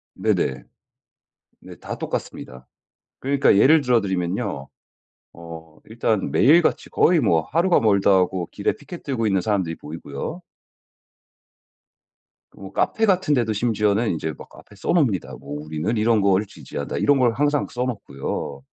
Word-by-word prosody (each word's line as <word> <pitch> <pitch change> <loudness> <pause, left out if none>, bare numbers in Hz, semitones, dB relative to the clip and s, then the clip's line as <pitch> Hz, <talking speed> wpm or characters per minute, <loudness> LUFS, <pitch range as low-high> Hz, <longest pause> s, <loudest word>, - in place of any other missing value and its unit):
네네. - - -1 1.0
네. - - -12
다 - - -7
똑같습니다. 65 0 -6 0.5
그러니까 140 -5 +3
예를 150 +7 +6
들어 125 -3 +2
드리면요 90 -7 -3 0.7
어 80 -1 -11
일단 110 -2 -1
매일같이 160 +5 +3
거의 170 -2 +3
뭐 85 -9 +2
하루가 170 - +2
멀다 100 -3 +3
하고 90 -2 +1
길에 - - -1
피켓 175 - -11
들고 120 -6 -2
있는 95 -2 +2
사람들이 95 -5 -1
보이고요. 80 - -7 2.2
뭐 - - -10
카페 225 - +1
같은 185 -6 +2
데도 120 -5 +1
심지어는 105 0 +1
인제 80 -1 -3
막 - - -12
앞에 105 - -16
써 100 - -7
놉니다. 120 - 0
뭐 75 +1 -7
'우리는 80 +8 -3
이런 110 0 +2
거를 100 +1 +2
지지한다.' 70 -6 -7
이런 145 -2 +3
걸 120 -2 +3
항상 145 +3 0
써 125 - -3
놓고요. 70 - -5
105 Hz, 305 characters per minute, -22 LUFS, 85-130 Hz, 2.2 s, 예를